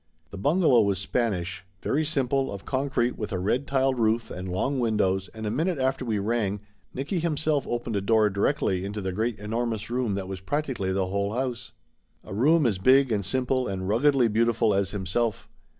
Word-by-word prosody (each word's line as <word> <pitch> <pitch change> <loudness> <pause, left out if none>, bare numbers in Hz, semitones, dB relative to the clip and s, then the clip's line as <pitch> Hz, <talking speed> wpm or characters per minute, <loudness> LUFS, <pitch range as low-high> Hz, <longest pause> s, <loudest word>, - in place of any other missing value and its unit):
The 100 - -7
bungalow 145 - +4
was 100 -2 +1
Spanish. 95 -3 -2 0.2
Very 155 +3 +1
simple, 135 -3 0
of 100 -1 -8
con 135 +1 -1
crete, 120 -2 0
with 105 - -4
a 95 - -1
red 120 +10 0
tiled 135 -2 +1
roof 115 +1 +1
and 90 +1 -6
long 130 +10 -1
windows, 95 -5 +1
and 110 -1 -7
a 105 - -1
minute 160 +8 0
after 130 0 0
we 110 -4 -1
rang, 105 -1 -1 0.3
Nicky 145 +8 -2
himself 155 -3 0
opened 120 -2 -2
a 100 - 0
door 110 +1 +3
directly 100 -3 0
into 100 +2 -4
the 95 -1 -3
great 110 +4 -1
enormous 110 +1 -3
room 120 -5 0
that 95 -1 -4
was 95 -1 -5
practically 130 -4 -2
the 95 0 0
whole 100 +2 -1
house. 125 -2 -3 0.5
A - - -9
room 150 +8 +4
as 105 -6 +1
big 130 +5 +5
and 105 -2 0
simple 130 +5 0
and 95 -1 -3
ruggedly 125 +4 +3
beautiful 115 0 +2
as 100 -1 +1
himself. 105 +3 -2
115 Hz, 195 wpm, -26 LUFS, 100-130 Hz, 0.5 s, big